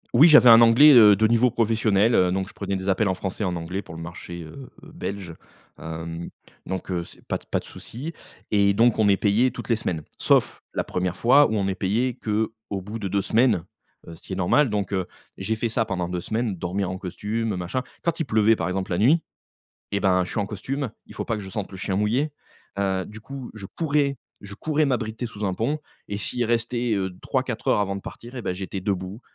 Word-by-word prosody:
Oui 155 - +8
j'avais 150 -7 +8
un 115 +1 +9
anglais, 120 +6 +8
heu, 105 -5 +8
de 110 +3 +2
niveau 120 +3 +4
professionnel, 115 -1 +2
heu, 90 -3 +4
donc 95 0 -1
je - - -14
prenais 100 - -3
des 95 0 -4
appels 100 +2 +2
en 95 - 0
français 95 +3 -5
et 105 - +1
en 90 - -2
anglais 85 +4 -4
pour 80 - -11
le 80 - -7
marché, 85 +1 -8
heu, 125 - -11
belge, 100 - -6 0.5
hem, 80 +1 -6 0.4
donc, 95 0 -4
heu, 85 -2 -1
c'est - - -17
pas - - -2
d - - -24
pas - - +1
de - - -14
souci. 145 +8 -8 0.4
Et 100 -1 +4
donc, 115 +1 +3
on 110 - +4
est 100 - +4
payé 110 +5 +3
toutes 125 - -8
les 115 - +4
semaines, 85 -8 -3 0.2
sauf - - +2
la - - 0
1re 90 0 -2
fois 140 +5 +6
où 110 - -1
on 100 -2 0
est 95 - 0
payé 110 +7 0
qu'au 110 -2 -3
bout 105 +4 -7
de 100 - -3
2 100 +1 0
semaines, 110 -7 +2 0.4
heu, 85 - -8
ce - - -17
qui - - -7
est - - -2
normal, 105 +10 +3
donc 105 -1 -2
heu, 95 -2 -1 0.3
j'ai 110 +4 -1
fait 115 +2 -1
ça 115 - +1
pendant 95 -5 -3
2 90 -1 -3
semaines, 110 0 -2
dormir 90 +2 -2
en 95 - -5
costume, 105 +4 -3
machin. 90 +8 -2 0.2
Quand 170 -1 -1
il 165 - 0
pleuvait, 110 -2 +4
par 85 -5 -2
exemple, 95 +1 -3
la 85 - 0
nuit, 150 +10 +4 0.7
et 100 - 0
ben, 95 -2 +2
je - - -8
suis - - -2
en 100 - -1
costume, 125 +6 -4 0.2
il - - -14
faut - - -4
pas 115 - -1
que 105 - -6
je 95 - -9
sente 105 -1 -4
le 95 - -9
chien 95 +1 -2
mouillé, 120 +9 +1 0.5
heu, 95 -2 0
du 105 +4 -10
coup, 135 +2 -8
je 100 -3 -9
courais, 145 - 0 0.2
je 100 0 -9
courais 155 +5 0
m'abriter 120 -2 -2
sous 105 -2 -5
un 95 - 0
pont 120 +10 -1 0.3
et 100 - -3
s'il 120 +4 -2
restait, 120 0 0
heu, 95 -1 -1
3-4 - - -2
heures - - +4
avant 100 -1 -1
de 100 - -6
partir, 120 +6 -10
et 125 - -4
ben, 90 - -3
j'étais 95 0 -5
debout, 95 +2 -3
105 Hz, 240 wpm, -24 LUFS, 95-115 Hz, 0.7 s, un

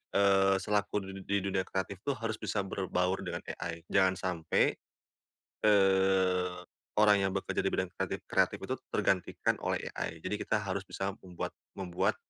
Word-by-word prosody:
eee, 95 -1 +5
selaku 105 0 +1
di 95 - -7
di 100 0 +2
dunia 95 -1 +1
kreatif 95 0 -3
tuh 140 +1 -1
harus 110 -1 -3
bisa 105 -1 -1
berbaur 95 -1 0
dengan - - -4 0.2
AI 85 -1 -4
jangan 95 -1 +5
sampai, 85 -3 +1 0.9
eee, 95 -2 +4 0.4
orang 105 -1 +6
yang 95 - +2
bekerja 95 - -1
di - - +1
bidang 95 0 -1
kreatif-kreatif - - 0
itu - - -3
tergantikan - - +1
oleh - - -1
AI. 80 - -4
Jadi 105 +3 -2
kita - - +1
harus 100 -2 -2
bisa 95 0 -2
membuat 90 -2 -5 0.2
membuat 90 -3 0
95 Hz, 150 wpm, -31 LUFS, 95-100 Hz, 0.9 s, orang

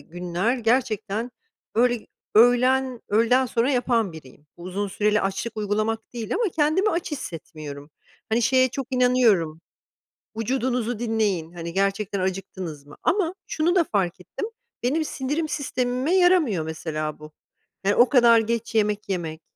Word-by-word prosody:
günler 175 - -2
gerçekten 225 -1 0 0.4
öğle 240 0 +2 0.3
öğlen 250 +2 +4
öğleden 235 +5 +3
sonra 240 +2 +1
yapan 240 -7 +1
biriyim, 145 -1 -14
uzun 185 +4 -4
süreli 210 +2 +1
açlık 195 +4 -3
uygulamak 215 +2 -2
değil 230 -3 -4
ama 460 +4 +1
kendimi 320 +7 +3
aç 335 0 -2
hissetmiyorum, 155 - -7 0.4
hani, 225 +2 +1
şeye 255 +2 +4
çok 260 +1 -5
inanıyorum. 235 -11 +3 0.8
Vücudunuzu 245 0 -1
dinleyin, 210 -8 0
hani, 170 -1 -6
gerçekten 195 +1 0
acıktınız 185 -5 -4
mı? 145 - -13
Ama 360 -2 +1
şunu 330 +3 +1
da 355 - +5
fark 190 - 0
ettim, 180 - -6 0.4
benim 310 +6 +1
sindirim 295 +4 -2
sistemime 255 +2 -1
yaramıyor 355 - +4
mesela 155 -1 -4
bu. 155 0 -11 0.5
Yani, 205 - +3
o 240 0 +5
kadar 235 -3 +6
geç 230 +1 -2
yemek 210 -1 +1
yemek, 165 -4 -3
225 Hz, 135 wpm, -24 LUFS, 185-255 Hz, 0.8 s, kadar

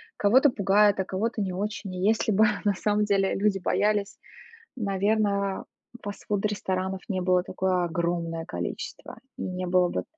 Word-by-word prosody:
кого-то 255 +8 +5
пугает, 205 -2 +3
а - - 0
кого-то 215 +5 -2
не 190 -2 -1
очень. 200 +1 -4
И 180 - -5
если 220 0 +2
бы 215 +2 +5 0.2
на 205 -1 +2
самом 210 +2 +1
деле 195 -2 +1
люди 195 -1 +1
боялись, 205 +2 0 0.6
наверно, 200 -2 0 0.4
фастфуд-ресторанов 195 -2 -2
не 185 -2 -1
было 180 0 +3
такое 185 0 0
огромное 170 -1 -2
количество, 180 - -6 0.2
и - - -7
не 185 0 -3
было 180 0 +3
бы - - -2
195 Hz, 145 wpm, -26 LUFS, 185-210 Hz, 0.6 s, кого-то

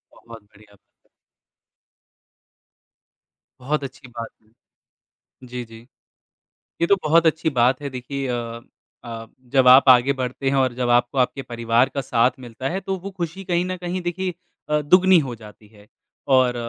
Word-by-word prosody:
बहुत 115 -1 -13
बढ़िया 105 0 -22
बा - - -26 2.8
बहुत 145 +3 -2
अच्छी 135 -1 -9
बात। 115 -2 -7 1.1
जी, 125 0 -6
जी। 115 +1 -15 0.9
ये 170 - +3
तो 200 - +4
बहुत 165 +2 +3
अच्छी 160 0 +1
बात 130 0 +2
है 140 - -3
देखिए 135 +1 -5
अ 115 -1 -4 0.4
अ, 115 -1 -7 0.2
जब 130 -1 +4
आप 130 +2 +7
आगे 130 +2 +6
बढ़ते 130 +1 -3
हैं 140 - 0
और 130 -2 +2
जब 125 -1 -2
आपको 120 +2 +2
आपके 130 +2 0
परिवार 115 0 +1
का 140 - -4
साथ 120 -2 +2
मिलता 125 +1 -6
है, 185 +5 -3
तो 195 0 -3
वो 195 +2 -8
खुशी 180 +1 -6
कहीं 175 -1 0
न 185 0 -3
कहीं 180 +1 -4
देखिए 180 +1 -3 0.3
अ, 150 0 +1
दुगुनी 185 +4 +5
हो 135 -6 -2
जाती 105 -1 -15
है। 105 -1 -20 0.4
और 130 -2 +4
130 Hz, 160 wpm, -22 LUFS, 120-160 Hz, 2.8 s, आप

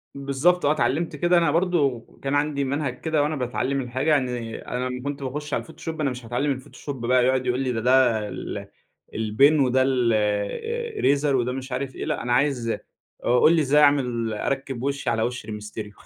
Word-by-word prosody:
بالضبط 140 +6 +1
آه، 145 - +4
اتعلمت 155 +2 0
كده 175 +4 +3
أنا 165 -3 +3
برضه 155 -8 +1 0.2
كان 140 +1 0
عندي 145 -1 0
منهج 135 -1 -2
كده 155 -2 +1
وأنا 150 +1 -1
باتعلم 135 +1 -1
الحاجة، 130 +4 -2
يعني 125 -6 0
أنا 125 +1 -4
لمّا 125 0 -5
كنت 140 0 -4
باخش 145 +3 -5
على - - +1
الفوتوشوب، 160 0 -7
أنا 145 - +1
مش 125 -2 -7
هاتعلم 120 +5 -1
الفوتوشوب 130 -1 -6
بقى 125 0 +4
يقعد 130 0 +1
يقول 125 0 0
لي 130 -2 0
ده 115 - -2
ده 120 -3 +3
ال - - -6 0.5
البِن 125 +8 +3
وده 130 -1 +3
الرِيزر 135 - 0
وده 125 -1 0
مش 130 +1 -6
عارف 130 +1 -3
إيه، - - -4
لأ، 150 -1 -2
أنا 120 - 0
عايز 130 -3 +1 0.5
أ - - -1
قُل 160 - +6
لي 160 - +3
إزاي 150 +1 +4
أعمل 125 -6 +2
أركب 135 +2 -3
وشي 140 0 -1
على 115 -1 0
وش 125 -1 -3
ري 110 - -7
مستريو 105 0 -7
135 Hz, 195 wpm, -24 LUFS, 125-145 Hz, 0.5 s, قُل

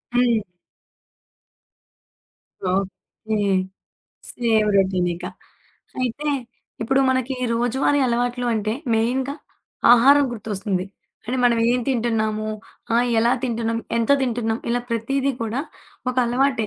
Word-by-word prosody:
హ్మ్. 235 -4 +2 2.2
Okay. 195 +3 -3 0.9
Same 220 -3 +1
రొటీనిక. 180 -2 +1 0.8
అయితే 255 +4 -2 0.5
ఇప్పుడు 270 +4 +2
మనకి 260 0 0 0.2
రోజువారీ 245 +5 +1
అలవాట్లు 245 +1 0
అంటే 215 0 -1 0.2
మెయిన్‌గా 255 +5 0 0.6
ఆహారం 275 +4 +6
గుర్తొస్తుంది. 200 -4 -3 0.4
అంటే 250 +3 -1
మనమేం 235 +1 +3
తింటున్నాము? 220 -3 0 0.5
ఆహ్, 245 +1 +3
ఎలా 235 +2 +3
తింటున్నాం? 230 -2 -1 0.2
ఎంతో 230 +5 +4
తింటున్నాం? 230 -2 -1
ఇలా 245 - +1
ప్రతీదీ 270 +4 0
కూడా 230 +4 -2 0.5
ఒకలవాటే. 250 -1 +1
235 Hz, 90 wpm, -22 LUFS, 220-250 Hz, 2.2 s, ఆహారం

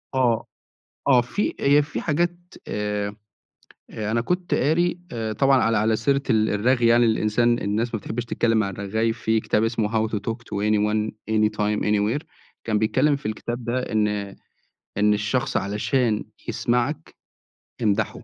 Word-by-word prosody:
آه، 120 -4 +2 0.6
آه 130 -3 +6
في 130 +12 -2
هي 145 +1 +5
في 150 - -5
حاجات 175 +2 0 0.3
آآ 105 -1 -2 0.7
أ 110 0 -4
أنا 115 0 +1
كنت 180 +6 -2
قاري 175 +5 +1
آآ 110 -2 -3
طبعًا 135 +2 +3
على 115 -1 +2
على 110 +1 +2
سيرة 140 +5 +1
ال 110 -2 +3
الرغي 120 +3 +2
يعني 120 +1 +5
للإنسان 115 +2 +2
الناس 110 +4 -1
ما 110 - -1
بتحبش 115 +4 -4
تتكلم 115 -1 +1
مع 110 -3 +1
الرغّاي 110 +4 -1
في 110 0 0
كتاب 105 0 0
اسمه 115 -1 0 0.2
how - - -12
to - - -1
talk 115 +3 -3
to 105 -2 -2
anyone 105 0 +1 0.2
any 110 -1 +3
time 105 0 +1
anywhere 105 +7 +1 0.4
كان 110 -2 0
بيتكلم 130 +7 +2
في 140 - -10
الكتاب 120 +2 -4
ده 120 +2 0
إن 105 -1 +2 0.9
إن 105 +1 +4
الشخص 105 +5 -1
علشان 105 +3 0 0.2
يسمعك، 125 +6 -1 0.7
امدحه 105 -1 0
115 Hz, 160 wpm, -23 LUFS, 105-125 Hz, 0.9 s, آه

